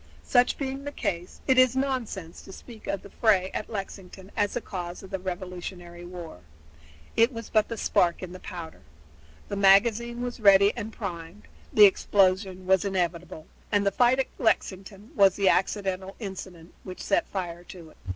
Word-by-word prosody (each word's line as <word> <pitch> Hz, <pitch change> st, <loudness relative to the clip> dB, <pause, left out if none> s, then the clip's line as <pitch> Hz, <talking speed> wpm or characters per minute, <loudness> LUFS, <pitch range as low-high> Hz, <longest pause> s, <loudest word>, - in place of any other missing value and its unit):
Such 245 Hz, -1 st, +3 dB
being 270 Hz, 0 st, -4 dB
the 285 Hz, -, -5 dB
case, 175 Hz, -8 st, -4 dB
it 260 Hz, -1 st, +4 dB
is 255 Hz, -1 st, +5 dB
nonsense 245 Hz, -11 st, -3 dB
to -, -, -12 dB
speak 225 Hz, +2 st, -12 dB
of 200 Hz, -, -3 dB
the 200 Hz, -, -13 dB
fray 195 Hz, -5 st, +2 dB
at -, -, -4 dB
Lexington 195 Hz, -2 st, -7 dB
as 205 Hz, -2 st, 0 dB
the -, -, 0 dB
cause 180 Hz, -5 st, -7 dB
of 190 Hz, -, -12 dB
the 190 Hz, -, -2 dB
Revolutionary 180 Hz, -1 st, -7 dB
War. 175 Hz, -, -9 dB, 0.8 s
It 230 Hz, +3 st, +4 dB
was 230 Hz, -3 st, -8 dB
but 215 Hz, -1 st, +3 dB
the 230 Hz, -, -5 dB
spark 175 Hz, -3 st, +1 dB
in 180 Hz, -, -6 dB
the 185 Hz, -, -9 dB
powder. 170 Hz, -4 st, -9 dB, 0.7 s
The -, -, -4 dB
magazine 230 Hz, +5 st, +4 dB
was 245 Hz, -1 st, -5 dB
ready 200 Hz, -1 st, +6 dB
and 220 Hz, -, -5 dB
primed, 180 Hz, -2 st, -7 dB, 0.3 s
the 210 Hz, -, +8 dB
explosion 190 Hz, -1 st, +2 dB
was 190 Hz, -1 st, +3 dB
inevitable, 175 Hz, -4 st, -3 dB, 0.3 s
and 205 Hz, 0 st, +2 dB
the 200 Hz, -, +3 dB
fight 245 Hz, +5 st, +3 dB
at 265 Hz, -, +1 dB
Lexington 200 Hz, 0 st, -1 dB
was 195 Hz, -, +5 dB
the 195 Hz, -2 st, +3 dB
accidental 190 Hz, -1 st, -1 dB
incident 185 Hz, -5 st, -8 dB
which 185 Hz, -1 st, -8 dB
set 200 Hz, -, +1 dB
fire 175 Hz, -3 st, -5 dB
to 170 Hz, -4 st, -12 dB
it. -, -, -23 dB
195 Hz, 175 wpm, -26 LUFS, 180-220 Hz, 0.8 s, the